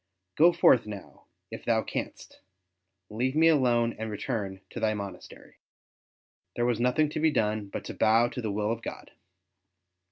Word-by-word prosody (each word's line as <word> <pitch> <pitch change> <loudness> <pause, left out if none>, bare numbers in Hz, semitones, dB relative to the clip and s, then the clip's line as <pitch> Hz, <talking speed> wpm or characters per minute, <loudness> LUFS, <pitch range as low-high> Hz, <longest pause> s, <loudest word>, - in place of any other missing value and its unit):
Go 170 +3 +6
forth 130 -9 +4
now 105 -2 -10 0.3
if - - -8
thou - - +1
canst; - - -6 0.7
leave 125 +5 -1
me 160 +1 +5
alone 120 -6 +2
and 110 0 -4
return 105 -3 -4
to - - -6
thy 110 -1 +1
monastery." 100 -1 -9 1.0
There 120 - 0
was 120 -2 0
nothing 125 +6 +2
to 150 - -4
be 160 +1 +3
done 105 -6 -1
but - - -7
to - - -6
bow 115 +2 +3
to 125 - -6
the 110 -3 -3
Will 105 +2 -1
of 115 0 -3
God. - - -8
115 Hz, 165 wpm, -28 LUFS, 105-130 Hz, 1.0 s, Go